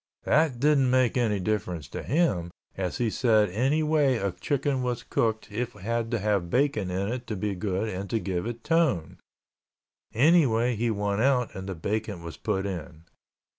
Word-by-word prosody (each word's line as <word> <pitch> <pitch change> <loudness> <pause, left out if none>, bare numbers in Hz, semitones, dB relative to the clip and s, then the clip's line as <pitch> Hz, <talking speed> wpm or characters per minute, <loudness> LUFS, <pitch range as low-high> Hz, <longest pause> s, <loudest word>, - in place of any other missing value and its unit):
That 150 -4 +2
didn't 140 -2 +3
make 130 -2 +3
any 110 -5 +1
difference 90 -6 -2
to - - -5
him, 115 - +1 0.3
as 90 -2 -3
he 115 -3 0
said 110 -4 +3
any 135 - +1
way 150 -4 +3
a 100 -2 -1
chicken 140 - -1
was 120 -2 -2
cooked 110 -1 -1
it 120 +4 -2
had 115 +3 -2
to 120 - 0
have 100 -4 0
bacon 125 -5 +1
in 95 +3 -1
it 125 +1 -4
to 110 - -3
be 100 +1 -2
good 95 +2 -2
and 100 -1 -5
to 115 - 0
give 95 -2 -2
it 120 -1 -6
tone. 155 - +1 0.9
Anyway 125 -4 +3
he 115 +2 0
won 100 -1 -1
out 125 -2 +2
and 95 0 -7
the 95 - -3
bacon 100 +1 -3
was 85 -1 -7
put 100 -3 -2
in. 85 -4 -6
110 Hz, 180 wpm, -27 LUFS, 95-125 Hz, 0.9 s, didn't